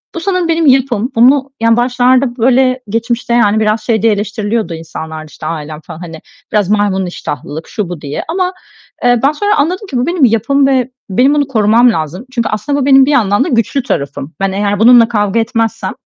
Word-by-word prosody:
bu - - -3
sanırım 365 -1 -1
benim 330 0 +1
yapım. 260 -3 +2
Bunu, 265 +4 +3
yani, 230 0 +3
başlarda, 250 +1 +1
böyle, 255 +1 +2
geçmişte, 230 +2 -2
yani, 215 -3 +3
biraz 215 0 0
şey 220 -3 0
diye 225 -1 +3
eleştiriliyordu 210 -1 -3
insanlar 160 -1 -7
da, - - -10
işte, 155 - -11
ailem 155 -1 -5
falan, 160 - -11
hani, 165 -2 -9 0.3
biraz 205 -3 +1
maymun 205 -2 +1
iştahlılık, 155 -2 -6
şu, 205 -5 -4
bu 175 -4 -7
diye 145 0 -5
ama, 365 +2 -1 0.5
eee, 245 -1 +3
ben 275 - +4
sonra 410 +7 0
anladım 365 +8 -1
ki 265 - -4
bu 245 - 0
benim 340 -5 +2
yapım 250 +5 +2
ve 260 -2 +1 0.2
benim 250 +9 +3
bunu 290 -2 +1
korumam 235 0 +3
lazım. 165 - -4
Çünkü 235 -2 -1
aslında 280 +7 -2
bu - - -1
benim 270 -1 +6
bir 290 - 0
yandan 210 -5 +2
da - - -4
güçlü 245 +2 0
tarafım. 145 - -4
Ben 195 0 0
eğer 200 +1 -1
bununla 235 0 +6
kavga 210 -1 0
etmezsem 225 -3 -2
230 Hz, 200 wpm, -13 LUFS, 200-265 Hz, 0.5 s, benim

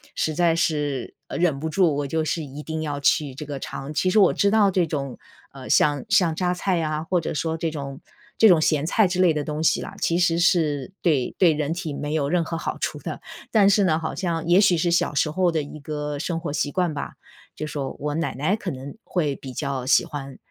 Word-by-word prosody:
实 155 - 0
在 170 -1 +3
是 150 -6 -1 0.2
忍 165 -5 0
不 160 - -3
住， 165 -2 +2
我 145 -1 -2
就 160 +3 -1
是 160 +1 -1
一 145 +1 -8
定 160 0 -4
要 145 -2 -3
去 140 -1 +1
这 150 - -7
个 140 -2 -5
尝。 140 +3 -6
其 185 +4 +1
实 200 - +1
我 195 - +5
知 200 - +2
道 205 -3 +4
这 180 -2 +2
种， 140 -4 -4 0.3
呃， 135 -2 -10
像 145 +4 +3
像 185 -5 +4
榨 180 +1 0
菜 180 -1 0
啊， 155 0 -2
或 180 +2 0
者 - - -3
说 160 +1 -2
这 165 0 -1
种 140 -3 -6 0.4
这 225 - +8
种 175 -6 +6
咸 155 -2 +2
菜 210 +6 +3
之 180 0 -2
类 175 -3 +5
的 150 -1 -2
东 150 +1 -4
西 - - +3
啦， - - -8
其 170 - +1
实 170 -2 +2
是 160 -2 +1
对 145 -8 +1
对 175 -3 +6
人 150 +1 -1
体 170 -4 -4
没 145 +1 -4
有 145 -3 0
任 180 +2 +2
何 165 - -3
好 - - -4
处 - - -3
的。 - - -6 0.3
但 205 -3 +5
是 200 0 +4
呢， 160 -4 +2
好 160 - -4
像 165 -3 -2
也 175 +3 +5
许 185 -4 +4
是 175 +2 +1
小 170 - +1
时 145 - +2
候 180 +1 +2
的 160 -2 0
一 145 +2 -9
个 150 0 -4
生 165 +1 -2
活 160 -3 -4
习 145 -1 -1
惯 180 -4 0
吧， 140 - -5 0.4
就 155 - -5
说 140 -3 -4
我 150 0 -2
奶 165 - -1
奶 155 +10 +1
可 195 -5 -5
能 135 +1 -8
会 150 -6 -1
比 135 - -9
较 135 -2 -3
喜 135 - +4
欢 140 -2 -7
155 Hz, 260 characters per minute, -24 LUFS, 145-175 Hz, 0.4 s, 这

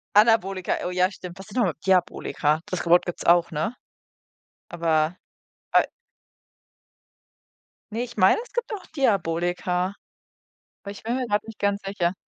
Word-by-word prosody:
Anabolika, 205 -4 +3
oh 180 - -2
ja, 180 +1 +2
stimmt. 180 -1 -9
Was 195 - -10
sind 215 +4 -8
nochmal 195 -10 +2
Diabolika, 165 -4 +1
das 185 - -3
ge 170 - -4
Wort 175 - +6
gibt's 175 - -5
auch, 170 0 +5
ne? 160 +10 -2 0.9
Aber, 165 0 +1 0.6
a - - +6 2.1
Ne, 230 +3 -2
ich 240 -1 -9
meine, 185 - +5
es - - -17
gibt 485 -2 -2
auch 385 -3 -6
Diabolika, 180 - 0 0.9
aber 200 - -6
ich 205 - -11
bin 235 +2 -1
mir 255 -2 -2
grad 205 -1 +1
nicht 225 - -10
ganz 200 0 +1
sicher. 185 -3 0
185 Hz, 150 wpm, -25 LUFS, 175-215 Hz, 2.1 s, Wort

